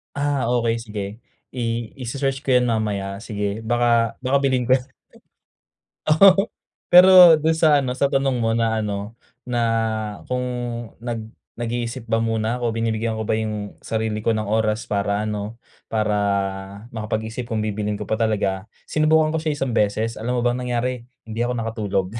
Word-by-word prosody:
Ah, 145 -3 0
okey, 120 -2 +1
sige. 105 -2 -5 0.5
I 125 - -3 0.4
ise-search 135 +2 -2
ko - - -5
yan 125 0 +3
mamaya 100 -3 -2
sige, 105 0 -3
baka 115 0 +2
baka 130 +2 +3
bilhin 130 -2 +2
ko - - 0
yan. 125 - -11 1.2
Oo, 195 +6 +6 0.4
pero 180 -1 +9
dun 160 +2 +2
sa 155 -2 +4
ano, 125 -2 -2
sa 140 - +3
tanong 135 -2 +1
mo 115 -1 +1
na 115 -1 +1
ano, 105 +1 -4 0.3
na 125 -1 -1 0.7
kung 125 0 -1 0.6
nag 120 -1 -3 0.4
nag-iisip 120 0 -3
ba 115 0 +1
muna 115 0 0
ako, 120 - +1
binibigyan 115 0 -1
ko 110 - -3
ba - - +1
yung 105 -2 -3
sarili 110 -1 -2
ko 115 - +1
ng 110 -1 -1
oras 110 +1 0
para 100 +1 -1
ano, 105 +2 -4 0.3
para 105 -1 0 0.8
makapag-isip 110 +2 -4
kung 110 - -1
bibilhin 105 0 -2
ko 105 - -6
pa - - 0
talaga. 105 -3 -1 0.2
Sinubukan 155 0 +2
ko 160 - -1
siya 155 -2 -1
isang 130 -4 -1
beses, 110 +1 +1
alam 125 +3 -2
mo - - +2
ba 120 - +2
ang 125 - -4
nangyari? 125 0 -2 0.2
Hindi 110 +1 -5
ako 120 +1 0
nakatulog. 110 -4 -1
115 Hz, 165 wpm, -22 LUFS, 110-125 Hz, 1.2 s, pero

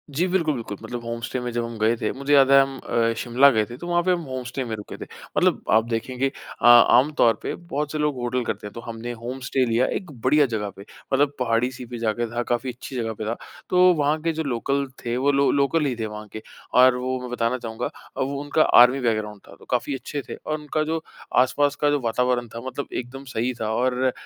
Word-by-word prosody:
जी। 175 - +2
बिल्कुल, 170 -5 +1
बिल्कुल। 105 -4 -6
मतलब 120 +1 -6
होम 115 0 -4
स्टे 125 +1 -3
में 125 -1 -4
जब 120 0 -1
हम 115 -1 -7
गए 110 +2 +3
थे। - - 0
मुझे 140 +1 0
याद 135 -1 +6
है 135 0 +8
हम 135 0 -2
अ, 115 0 0
शिमला 130 +3 +5
गए 110 -2 +1
थे। 120 +3 -10
तो 175 - -8
वहाँ 175 0 +2
पे 185 - +2
हम 175 -1 +1
होम 130 -2 -5
स्टे 130 +2 -4
में 110 - -3
रुके 105 -1 -9
थे। - - -7 0.3
मतलब - - +2
आप 110 - +3
देखेंगे 125 +3 -1 0.3
अ, - - 0
आमतौर 120 +1 +6
पे - - -3
बहुत 150 -4 -4
से 155 - -3
लोग 150 -2 0
होटल 125 0 -1
करते 105 - -4
हैं। - - -11
तो 115 - -7
हमने 115 +1 -6
होम 130 +2 -5
स्टे 130 -2 +2
लिया 115 +2 +2
एक 180 -6 -5
बढ़िया 145 +3 +4
जगह 105 -2 -2
पे। 100 - -11 0.3
मतलब 145 +1 +3
पहाड़ी 120 +1 +1
सी 125 0 -9
पे 120 0 -7
जाकर 115 +1 -1
था 120 - 0
काफ़ी 125 +1 -2
अच्छी 130 +2 -9
जगह 115 -2 -2
पे 110 - -6
था 115 +2 -1 0.3
तो 180 - +2
वहाँ 150 0 +1
के 165 0 0
जो 160 0 -2
लोकल 140 +2 -1 0.2
थे 120 +1 -1
वो 140 +2 +2
लो 140 0 +3
लोकल 145 +2 +2
ही 130 -3 -1
थे 110 - -1
वहाँ 105 0 -7
के 110 - -6 0.3
और 125 0 +6
वो 130 +1 -2
मैं 125 - -6
बताना 125 +1 0
चाहूँगा 115 0 -5 0.3
अब 130 - 0
उनका 145 +2 0 0.2
आर्मी 125 +3 +6
बैकग्राउंड 110 -3 -1
था 85 - -13
तो - - -16
काफ़ी 125 +3 0
अच्छे 145 +2 -5
थे - - -4
और 155 0 -4
उनका 150 +1 -2
जो 160 +1 -2 0.4
आसपास 145 +3 +1
का 145 - +4
जो 145 -1 +2
वातावरण 120 0 0
था 115 - -5
मतलब 135 +2 -5
एकदम 130 +3 -5
सही 120 +3 0
था 110 - -1
और 130 +1 +1
125 Hz, 245 wpm, -24 LUFS, 115-140 Hz, 0.4 s, है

